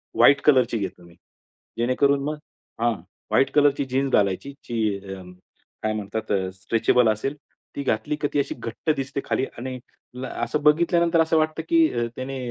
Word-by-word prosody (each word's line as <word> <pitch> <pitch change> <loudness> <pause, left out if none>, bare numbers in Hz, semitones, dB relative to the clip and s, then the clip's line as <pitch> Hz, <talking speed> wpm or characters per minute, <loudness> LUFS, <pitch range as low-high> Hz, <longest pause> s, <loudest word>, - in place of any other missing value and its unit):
White 140 0 +6
कलरची 130 -5 +4
घेतली 95 -4 -5
मी. 85 -1 -17 0.6
जेणेकरून 140 +4 +2
मग 150 +2 -3 0.4
हां. 120 0 +3 0.4
व्हाईट 130 - +3
कलरची 145 -1 +4
जीन्स 135 +1 0
घालायची 100 +7 +1 0.2
जी 110 -4 0
अ, 95 -1 -8 0.6
काय 110 - 0
म्हणतात 110 +1 -4
अ, 95 -1 +1
स्ट्रेचेबल 115 +5 +2
असेल 135 +7 -3 0.4
ती 140 - -3
घातली 110 +2 -1
क - - 0
ती - - +2
अशी 140 - -1
घट्ट 115 +7 -5
दिसते 140 0 -3
खाली 130 - 0
आणि 130 +1 -5 0.5
असं 150 +3 -2
बघितल्यानंतर 170 +2 +4
असं 160 0 +2
वाटतं 155 +1 0
की 165 -1 +5
अ, 120 -1 0
त्याने 135 +1 -5
130 Hz, 165 wpm, -24 LUFS, 110-145 Hz, 0.6 s, व्हाईट